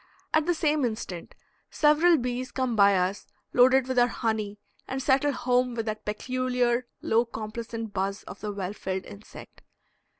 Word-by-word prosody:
At 315 0 +3
the 350 - +2
same 305 -2 +1
instant 215 -7 -4 0.3
several 315 +3 +4
bees 250 0 -3
come 255 -3 -1
by 200 -2 +5
us 185 +2 -1 0.3
loaded 260 +1 +5
with 260 -1 +1
our 245 - +5
honey 220 -3 -2 0.3
and 265 - -3
settle 270 +2 +2
home 250 -1 +1
with 225 -1 -2
that 215 -1 -4
peculiar 250 +2 0 0.2
low 230 +1 +3
complacent 225 -1 -6
buzz 195 +1 -2
of - - -10
the 210 - -4
well 200 -1 -4
filled 190 -2 -4
insect. 205 +1 -12
240 Hz, 160 wpm, -27 LUFS, 210-255 Hz, 0.3 s, by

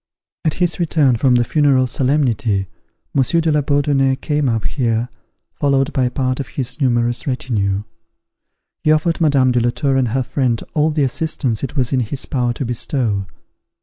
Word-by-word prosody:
At 155 - 0
his 175 -1 0
return 155 -6 +2
from 125 +1 +3
the 120 - +3
funeral 140 -1 +3
solemnity, 125 -7 0 0.5
Monsieur 140 +5 +2
de 160 -1 +1
la 150 0 +2
Bourdonnais 140 -1 +2
came 145 -1 -1
up 115 -2 -1
here, 120 -3 -1 0.4
followed 140 0 +1
by 130 -3 +1
part 130 0 -1
of 135 - -4
his 135 +3 -5
numerous 120 -1 +1
retinue. 105 -7 -1 1.0
He 155 - +3
offered 165 +2 +1
Madame 140 -5 +3
de 125 - +2
la 120 +1 +2
Tour 135 +2 0
and 130 -2 +2
her 130 +4 0
friend 125 -3 -1
all 155 0 +2
the 150 -2 0
assistance 135 -4 -1
it 135 - -4
was 130 -2 0
in 130 - +2
his 125 +3 -3
power 125 -3 0
to 130 - -4
bestow. 115 -4 -2
130 Hz, 175 wpm, -18 LUFS, 120-145 Hz, 1.0 s, from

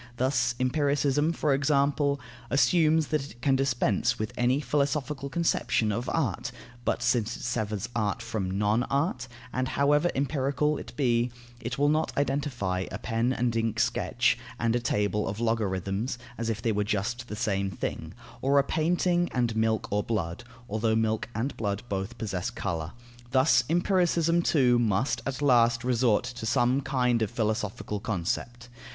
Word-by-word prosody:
Thus 125 -2 +1
empiricism, 145 +3 +2
for 155 -3 +1
example, 140 0 +2 0.3
assumes 160 +1 +3
that 155 -2 +1
it 135 -3 -12
can 135 -2 +4
dispense 130 -7 +1
with 110 0 -4
any 125 +3 +2
philosophical 145 -1 -1
conception 135 -8 +1
of 120 +5 -2
art; 140 -5 -1 0.3
but, - - 0
since 115 -1 +1
it - - -10
severs 110 -3 -2
art 110 0 0
from 100 -5 -3
non 105 +3 +2
art 140 -3 0 0.3
and, 130 0 0
however 145 +5 +2
empirical 140 +1 0
it 115 - -9
be, 120 -2 +2 0.3
it 120 +1 -4
will 145 +1 +3
not 155 +2 +1
identify 130 -10 -1
a - - -4
pen 115 +2 0
and 120 -2 0
ink 115 -1 0
sketch - - +1 0.2
and 115 0 +1
a - - +2
table 105 -3 0
of 105 - -4
logarithms, 110 0 -1 0.2
as 115 -1 -3
if 115 +1 -3
they 115 - +2
were 105 -1 +1
just 105 +5 -2
the 105 - -5
same 100 -4 0
thing, 95 - -5 0.3
or 140 +2 +3
a 140 - +6
painting 175 +3 +1
and 120 -3 0
milk 110 0 +1
or 105 +1 +2
blood 100 -2 -3 0.2
(although 110 +1 0
milk 110 0 0
and 120 +6 -2
blood 100 -1 -2
both 100 +4 -3
possess 95 -5 -3
colour) 85 -4 -4 0.4
thus 130 -1 +4
empiricism 170 -1 +2
too 125 -7 +3
must 115 +3 +1
at 135 +1 -3
last 120 -3 +4
resort 120 -3 +2
to 120 -2 -5
some 120 +4 +2
kind 125 -4 +1
of 110 - +1
philosophical 105 -2 -2
concept. 115 +5 -3
120 Hz, 160 wpm, -28 LUFS, 110-140 Hz, 0.4 s, a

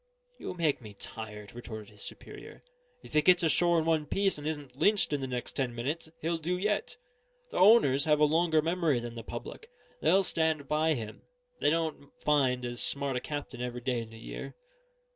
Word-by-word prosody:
"You - - -5
make 160 -6 +1
me 105 -3 -11
tired," 105 -1 -8
retorted 110 -3 -8
his 105 -1 -11
superior. - - -8 0.4
"If - - -13
he 150 - +5
gets 180 +2 +5
ashore 170 +2 +3
in 160 - +1
one 160 -2 +1
piece 195 -3 +1
and 145 - -5
isn't 145 -5 -5
lynched 205 +2 +3
in 145 - 0
the 135 - -2
next 125 -1 -4
ten 125 -3 -2
minutes, 145 +7 -3
he'll 165 +1 -1
do 175 +3 -1
yet. 210 +3 -1 0.5
The - - -2
owners 180 - +6
have 150 -1 +3
a 150 - +6
longer 160 0 +3
memory 165 -5 +1
than 120 0 -6
the 115 - -6
public; 120 - -8 0.3
they'll 195 +1 +4
stand 160 -5 0
by 155 +1 +2
him; 110 -3 -7 0.4
they - - +3
don't 160 -3 -2
find 130 -4 +2
as 120 0 -2
smart 140 -1 0
a - - +1
captain 145 -3 -6
every 125 0 -4
day 125 -1 -1
in 115 - -8
the 115 - -12
year." 115 - -8
145 Hz, 200 wpm, -30 LUFS, 125-165 Hz, 0.5 s, owners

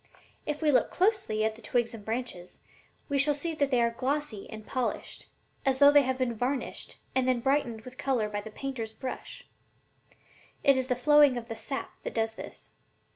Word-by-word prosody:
If 300 +1 -2
we 300 - +5
look 260 - +3
closely 370 - +1
at 220 - +1
the 225 - -14
twigs 240 -2 0
and 220 -2 -9
branches, 220 -6 -5 0.5
we 285 -2 +1
shall 290 +1 +4
see 325 +3 -2
that 285 -3 +1
they 250 -3 +3
are 235 - +2
glossy 260 -3 -2
and 215 -1 -8
polished, 255 -2 -3 0.4
as 265 -1 +2
though 285 +1 +8
they 290 0 +7
had 260 -1 -1
been 255 -2 0
varnished 250 +4 -3 0.2
and 260 -1 +2
then 255 -2 +3
brightened 260 -3 0
with 255 +3 -12
color 250 -6 +1
by 205 -1 -3
the 220 - -8
painter's 230 -1 -5
brush. 255 +2 -7 1.2
It 275 -1 +6
is 260 -1 0
the 250 - +1
flowing 290 0 +5
of 235 0 -6
the 225 - -4
sap 270 +4 -4
that - - -6
does 225 -1 +1
this. - - -10
255 Hz, 195 wpm, -29 LUFS, 225-280 Hz, 1.2 s, though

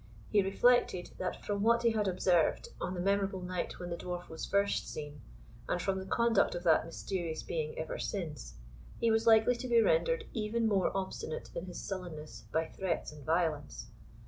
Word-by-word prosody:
He 205 - +5
reflected, 195 -1 +3
that 185 - -4
from 205 -1 -1
what 235 +2 +4
he 235 - +4
had 215 -2 0
observed 180 -3 +2
on 185 - -2
the - - -4
memorable 195 0 0
night 180 -1 -3
when 175 -1 -6
the - - -1
Dwarf 175 0 -5
was 160 - -5
first 200 0 +1
seen, 150 -1 -7 0.5
and 180 - +1
from 190 +1 0
the 190 - -7
conduct 235 -2 +3
of 175 - -4
that 165 -2 +4
mysterious 165 -1 -4
being 155 -2 -3
ever 160 - -4
since, 155 - -4 0.4
he 230 -1 +3
was 225 +1 +2
likely 225 +2 +6
to 255 +2 -5
be 235 -1 +5
rendered - - +3
even 225 0 0
more 200 -3 +3
obstinate 185 -4 -4
in 170 +2 -5
his 180 - -6
sullenness 175 -6 -6
by 160 +1 +1
threats 190 -1 -3
and 150 -1 -12
violence. 155 - -1
185 Hz, 185 wpm, -32 LUFS, 165-215 Hz, 0.5 s, likely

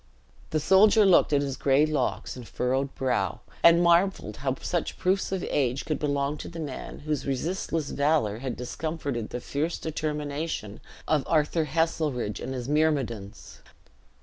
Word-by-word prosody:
The 155 - 0
soldier 205 +6 +5
looked 185 -4 +5
at 145 -1 +3
his 135 -2 -3
gray 140 +2 +3
locks 150 -4 -2
and 125 -3 -9
furrowed 130 +2 -1
brow, 125 -9 -1 0.2
and 170 +1 +7
marveled 170 - +2
how 130 -1 -1
such 175 -2 -2
proofs 190 +1 0
of 190 -2 -2
age 130 -1 0
could 155 - -2
belong 145 0 -1
to - - -7
the 170 - -8
man 145 -5 -6
whose 150 -1 -2
resistless 155 +2 -2
valor 140 -8 +1
had 130 -1 -4
discomfited 140 -2 -4
the 125 - -4
fierce 150 +7 -2
determination 150 -7 -3 0.3
of 150 -3 +2
Arthus 155 0 +1
Heselrigge 150 -7 -1
and 130 +1 -5
his 125 -1 -5
myrmidons. 135 -9 -1
145 Hz, 150 wpm, -27 LUFS, 130-160 Hz, 0.3 s, and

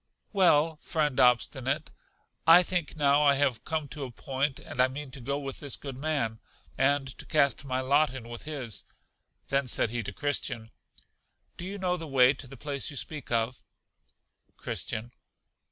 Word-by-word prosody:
Well, 165 -5 +4
friend 150 -4 -1
Obstinate, 130 +3 +2 0.6
I 170 +2 +9
think 175 -3 -2
now 145 -1 +4
I 140 -1 +5
have 135 -5 +1
come 155 -2 -2
to 145 +2 -6
a 130 - -5
point; 135 +3 -2
and 125 - -2
I 130 - +6
mean 135 +1 -7
to 130 - -7
go 140 +4 -2
with 135 -2 -6
this 145 -3 -2
good 135 -3 -7
man, 135 -6 -1 0.4
and 135 -1 +1
to - - -5
cast 140 -3 +2
my 130 -1 -1
lot 140 +2 +3
in 130 -3 -8
with 120 +3 -8
his. 135 -9 -3 0.6
Then 140 -1 +1
said 115 - +2
he 120 0 -1
to 105 - -5
Christian, 120 -6 -2 0.8
Do 175 - -7
you 200 +2 -5
know 180 -2 0
the 165 -2 -7
way 130 -2 +5
to 135 - -8
the 135 +2 -11
place 140 +1 -3
you 145 - -7
speak 150 0 -5
of? 115 +2 0 1.0
Christian. 110 +3 -3
140 Hz, 175 wpm, -29 LUFS, 125-150 Hz, 1.0 s, I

